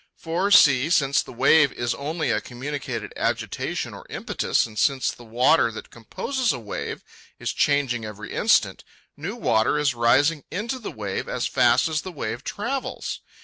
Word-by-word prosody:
For, 170 +4 -1
see, 140 -8 +6
since 140 -5 +2
a - - -8
wave 140 +3 +4
is 120 0 -2
only 155 +1 -2
a 110 -1 0
communicated 135 +3 -5
agitation - - -2
or - - -11
impetus, - - 0
and 110 -2 -7
since 135 -2 +2
the 120 - -13
water 120 +3 +3
that 110 - -9
composes 250 - -2
a - - -3
wave 105 -4 -6 0.3
is - - -3
changing 135 -5 +1
every 105 0 -8
instant, - - +2 0.3
new 170 +9 -5
water 115 - +2
is 150 -3 +1
rising 130 +6 +3
into 230 +7 -3
the 225 - -6
wave 100 -3 -4
as - - -2
fast 120 +4 +3
as 155 -1 -1
the 185 - -7
wave 120 -5 -5
travels. 250 - -4
140 Hz, 165 wpm, -24 LUFS, 120-165 Hz, 0.3 s, see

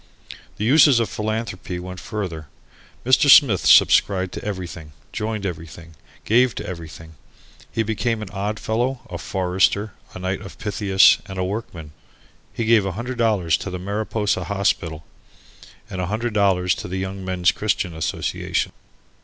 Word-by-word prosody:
The 105 - -2
uses 140 0 +6
of 115 -4 0
philanthropy 105 -4 -4
went 90 +1 -7
further. 90 -9 -5 0.6
Mr. 130 +3 +4
Smith 125 - +6
subscribed 95 -2 +5
to - - -6
everything, 90 -6 -6 0.2
joined 105 -1 -3
everything, 85 -1 -7 0.3
gave 120 +2 +3
to - - -5
everything. 80 -2 -9 0.6
He 115 - 0
became 110 +1 -1
an 100 - -9
Oddfellow, 110 +5 -2
a - - -5
Forester, 95 +2 0 0.2
A - - -5
Knight 95 +1 -3
of 100 - -10
Pythias 100 -2 +4
and 95 - -7
a 95 - 0
Workman. 90 -6 -6 0.6
He 115 - -3
gave 115 -2 +4
a 95 -1 -3
hundred 120 +5 -5
dollars 100 -8 +2
to - - -6
the 90 - -4
Mariposa 105 +2 -2
Hospital 90 -6 -1 0.8
and 95 - -5
a 90 - -2
hundred 110 +3 -2
dollars 95 -3 +2
to - - -7
the 90 +1 -4
Young 95 0 -4
Men's 90 -1 +2
Christian 100 -4 -1
Association. 80 -2 -2
100 Hz, 150 wpm, -22 LUFS, 90-110 Hz, 0.8 s, uses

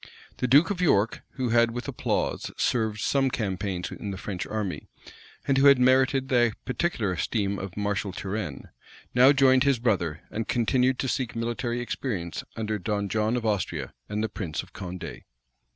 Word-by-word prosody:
The 125 - 0
duke 145 +9 +5
of 185 -3 -2
York, 115 - +2
who 130 -2 -2
had 115 0 +4
with 120 +1 -5
applause - - -1
served 110 -3 0
some 135 -1 +2
campaigns 95 -5 -3
in 105 - -6
the 95 - -4
French 95 0 -5
army, 105 -4 -3 0.6
and 135 -1 +3
who 140 - +6
had 140 -1 +8
merited 130 +1 +3
the 120 -4 +3
particular 125 - -1
esteem 100 +2 -1
of 95 -1 -7
Marshal 100 -1 -1
Turenne, 95 -6 -5 0.4
now 125 +3 +7
joined 135 -2 +5
his 140 -2 +3
brother, 90 -10 0
and 115 0 -3
continued 125 +2 +2
to 135 - -2
seek 125 -2 -2
military 120 +1 -2
experience 110 - -3
under 110 -1 -2
Don 100 +2 -2
John 110 +3 +1
of 120 - -3
Austria, 90 - -1 0.2
and 105 +1 -1
the - - +1
prince 95 -7 -4
of - - -18
Condé. 90 0 -7
115 Hz, 170 wpm, -26 LUFS, 100-130 Hz, 0.6 s, had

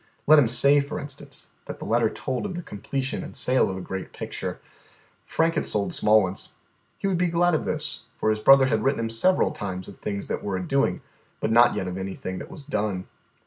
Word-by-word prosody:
Let 155 +1 +8
him 130 - +4
say, 140 +4 +4
for 140 +2 -5
instance, 145 -1 -8 0.2
that - - -7
the - - -8
letter - - +2
told 130 +10 -3
of 185 - -6
the 175 - -5
completion 130 +5 -4
and - - -9
sale 130 -4 +2
of 95 - -4
a - - -5
great 95 +1 -6
picture. - - -5 0.7
Frank 165 +1 +1
had 155 - -1
sold 100 -1 0
small 105 0 +4
ones. 95 +1 -5 0.4
He - - -6
would 190 -3 +1
be 180 - +3
glad 175 +1 +2
of 155 - 0
this, 150 -1 -3 0.2
for 110 - +1
his 110 - -1
brother 135 +5 +7
had 110 -4 +1
written 135 -3 +1
him 115 0 -2
several 185 +12 +3
times 95 -2 -5
of 100 - -12
things 100 -1 -4
that - - -4
were 100 -2 -2
a 90 - -4
doing, 135 0 +1 0.4
but 110 - -1
not 120 +1 +6
yet 95 - -2
of 90 +1 -4
anything 95 -1 -5
that - - -8
was 170 -6 -10
done. 105 -9 -2
120 Hz, 225 wpm, -25 LUFS, 100-145 Hz, 0.7 s, Let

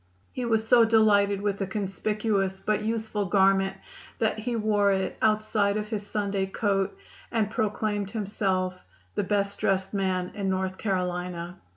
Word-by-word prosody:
He 250 - -3
was 225 -1 +1
so 240 0 +7
delighted 205 -3 +4
with 200 -1 -1
the 195 - -1
conspicuous 195 0 -1
but 215 +1 0
useful 220 -1 -1
garment 195 0 +3 0.4
that 220 -1 0
he 235 +2 -2
wore 210 -2 +2
it 190 -1 -1
outside 215 -1 +2
of 210 0 -4
his 215 -2 -3
Sunday 200 -2 -1
coat 195 -1 0 0.3
and 220 -2 0
proclaimed 210 -3 -1
himself 190 -4 -1 0.3
"the - - 0
best 200 0 0
dressed 190 0 0
man 185 -2 -1
in 195 -2 -2
North 190 0 -1
Carolina." 180 -2 -2
200 Hz, 150 wpm, -27 LUFS, 190-215 Hz, 0.4 s, so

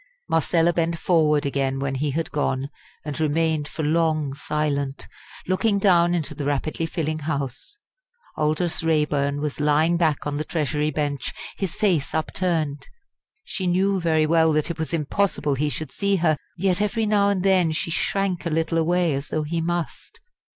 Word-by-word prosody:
Marcella 165 +1 +2
bent 165 0 0
forward 155 -4 +2
again 135 -1 0
when 135 0 -2
he 145 +3 -1
had 160 +4 -2
gone, 140 -1 -1 0.3
and 150 -1 -4
remained 155 -1 +1
for 160 - -5
long 155 -2 +1
silent, 140 -1 -2 0.4
looking 200 +3 +2
down 175 -3 +4
into 160 -4 -2
the 145 - -5
rapidly 145 +3 -1
filling 155 -1 -2
House. 145 - -4 0.6
Aldous 155 +3 0
Raeburn 150 -3 +1
was 150 -1 -3
lying 150 +3 +3
back 160 -4 +1
on 145 -1 -2
the 155 - -1
Treasury 150 -2 -1
bench, 145 -3 -2 0.2
his 190 -4 -3
face 175 -10 +1
upturned. 160 -4 -1 0.6
She 185 - -4
knew 190 +2 +2
very 160 -2 +2
well 160 0 +4
that 155 +2 0
it 165 - -7
was 160 - -2
impossible 160 -1 0
he 145 +3 0
should 155 +1 -5
see 200 0 +1
her; 165 -4 +2 0.2
yet 185 +1 +1
every 220 +2 0
now 205 -1 +3
and 195 -3 0
then 185 -4 +3
she 160 +1 -2
shrank 185 -2 -1
a - - 0
little 165 +1 0
away 175 0 +2
as 140 +2 -3
though 155 - -1
he 165 +2 -2
must. 175 0 -4
160 Hz, 170 wpm, -23 LUFS, 150-175 Hz, 0.6 s, down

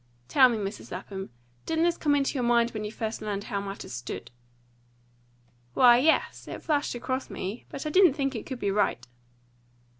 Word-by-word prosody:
Tell 255 - +6
me, 235 - -1
Mrs. 200 0 -5
Lapham, 190 +1 -6 0.4
didn't 325 0 +1
this 345 0 +3
come 290 -3 +1
into 275 -1 +1
your 265 - -1
mind 235 0 +3
when 215 -1 -5
you 210 - -4
first 220 0 -4
learned 205 -2 -3
how 200 -1 -3
matters 200 -8 -7
stood?" 120 +1 -6 1.4
"Why, 245 -1 +7
yes, 315 +5 +1
it - - -7
flashed 290 -5 0
across 255 +2 -3
me. 195 +6 -6
But 275 - -6
I 305 - -2
didn't 365 -5 +6
think 275 -2 -1
it 225 - -6
could 260 - -5
be 200 -4 -1
right." 195 - 0
235 Hz, 185 wpm, -27 LUFS, 200-275 Hz, 1.4 s, Why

